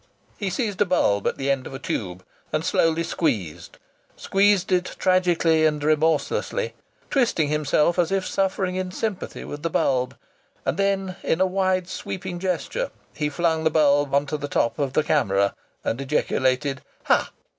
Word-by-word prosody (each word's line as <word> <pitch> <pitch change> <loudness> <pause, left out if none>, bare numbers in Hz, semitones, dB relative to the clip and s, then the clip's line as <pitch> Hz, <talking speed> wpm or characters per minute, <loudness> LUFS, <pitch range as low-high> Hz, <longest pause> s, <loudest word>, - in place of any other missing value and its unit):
He 200 - -3
seized 205 -2 -2
a - - +6
bulb 100 - +2
at - - -1
the 140 +1 0
end 135 -2 -1
of 135 - -8
a - - -3
tube 95 -8 -4 0.3
and 155 +1 -1
slowly 165 0 +2
squeezed 100 - -2 0.4
squeezed 200 -1 +2
it 180 0 +1
tragically 175 -3 +3
and 150 -2 +2
remorselessly, 155 - +1 0.4
twisting 230 - +2
himself 150 +3 +2
as 170 0 +2
if 195 -1 0
suffering 190 -1 0
in 185 -1 -2
sympathy 210 0 -4
with 145 - -7
the 165 - -1
bulb, 130 -5 0 0.5
and - - 0
then 195 -2 0
in 160 - 0
a 190 - +4
wide, 185 -1 0
sweeping 185 -1 -5
gesture 190 - -2 0.2
he 150 -1 -1
flung 160 +1 0
the 160 - +4
bulb 145 -2 +3
on 140 +1 +3
to 150 +1 -3
the 145 0 -4
top 115 -3 0
of 140 -2 -1
the 155 - +2
camera 100 -10 +2 0.3
and 120 - -2
ejaculated: 135 -1 0 0.2
"Ha!" - - +2
160 Hz, 165 wpm, -24 LUFS, 140-185 Hz, 0.5 s, a